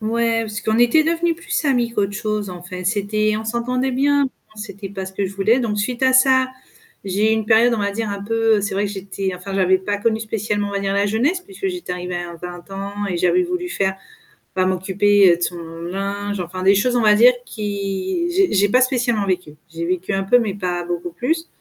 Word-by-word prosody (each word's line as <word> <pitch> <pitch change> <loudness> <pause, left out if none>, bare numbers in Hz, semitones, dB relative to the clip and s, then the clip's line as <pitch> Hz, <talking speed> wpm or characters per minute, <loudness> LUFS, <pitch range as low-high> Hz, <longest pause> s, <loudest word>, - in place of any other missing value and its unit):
Ouais, 230 +1 +1
parce 215 0 -5
qu'on 220 +1 0
était 240 +6 +5
devenu 335 +1 +1
plus 335 -1 -3
amis 245 -5 +2
qu'autre 205 -3 0
chose, 210 -1 -3
en 175 -1 -9
fait. 180 0 -7
C'était 215 +1 0
on 220 - -6
s'entendait 250 +3 -1
bien, 285 +2 +3 0.3
on - - -24
c'était 200 -2 -7
pas 190 -1 -6
ce 190 - -8
que 200 - -2
je 195 +1 -5
voulais. 215 +6 +2
Donc 210 -4 -1
suite 240 +4 -2
à 260 0 +4
ça, 260 0 +5 0.6
j'ai 205 +3 +1
eu - - +3
une 220 -1 0
période, 235 +2 +5
on 225 - -3
va 200 0 0
dire, 215 +1 -3
un 200 0 -5
peu 225 0 +2
c'est 200 -1 -3
vrai 200 +1 0
que - - -5
j'étais 195 -1 -4
enfin 190 +2 -7
j'avais 190 -1 +3
pas 205 +2 -2
connu 220 +1 0
spécialement, 210 -2 -2
on - - -7
va 200 - -1
dire, 195 0 -1
la 200 +1 +2
jeunesse, 255 - +1
puisque 390 +1 -5
j'étais 360 - -5
arrivée 180 0 -4
à 175 -1 -5
20 175 +2 -9
ans 200 +1 -4
et 180 - -2
j'avais 180 - +3
voulu 360 0 -3
faire 190 - -1 0.6
bah, 185 0 +2
m'occuper 190 0 +3
de - - -14
son 175 0 -1 0.2
linge, 200 +3 -3
enfin 180 +1 -6
des 195 +1 +5
choses, 245 +5 +1
on - - +2
va 210 -1 +5
dire, 240 +4 +7
qui 205 - -3
j'ai 375 +1 +2
j'ai 205 +1 +3
pas 255 +4 +4
spécialement 245 -5 +1
vécu. 180 -5 -2 0.2
J'ai 165 +1 -3
vécu 185 +3 -2
un 195 0 0
peu 230 +6 +4
mais 220 -4 -1
pas 180 -3 -3
beaucoup 175 0 -4
plus. 325 - -2
205 Hz, 235 wpm, -20 LUFS, 190-240 Hz, 0.6 s, dire